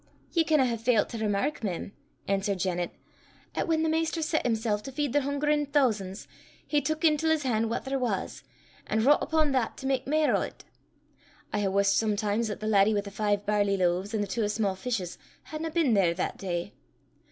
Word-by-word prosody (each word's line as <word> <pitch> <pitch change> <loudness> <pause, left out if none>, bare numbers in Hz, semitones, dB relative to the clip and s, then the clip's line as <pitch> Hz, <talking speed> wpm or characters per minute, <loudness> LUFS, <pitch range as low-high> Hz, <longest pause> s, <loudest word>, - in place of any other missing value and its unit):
"Ye 335 - +3
canna 310 -4 +3
hae 235 -2 -1
failt 230 -1 +2
to 230 - -5
remark, 215 +7 -1
mem," 195 -1 -3 0.4
answered 195 0 0
Janet, 180 -1 -1 0.6
"'at - - -1
whan 320 -1 +2
the - - +2
Maister 325 +1 0
set 315 0 0
himsel' 220 -2 0
to 270 +6 -8
feed 285 -1 -2
the 290 - +3
hungerin' 290 +1 0
thoosan's, 215 -9 0 0.4
he 295 -1 +1
teuk 310 +1 -2
intil 320 0 +3
's 320 -2 +2
han' 225 -3 +1
what 230 - -3
there 270 0 -1
was, 250 -2 -2 0.4
an' 220 +1 +1
vroucht 285 +6 +5
upo' 315 -2 +1
that 255 -4 0
to - - -8
mak 265 -1 0
mair 305 +1 +3
o' - - 0
't. - - -19 0.9
I - - +1
hae 205 - +1
wussed 200 +1 +3
sometimes 215 +1 0
'at 210 - -5
the - - -4
laddie 210 0 +4
wi' 205 - +1
the 200 0 -9
five 205 0 0
barley 205 -1 +2
loaves 185 +4 0
an' 215 - 0
the 205 - -1
twa 215 -1 -1
sma' 210 -2 0
fishes, 190 -4 -3 0.3
hadna 315 +1 -3
been 315 -6 +2
there 180 -5 +3
that 180 - -3
day. 175 0 -3
225 Hz, 205 wpm, -28 LUFS, 200-290 Hz, 0.9 s, vroucht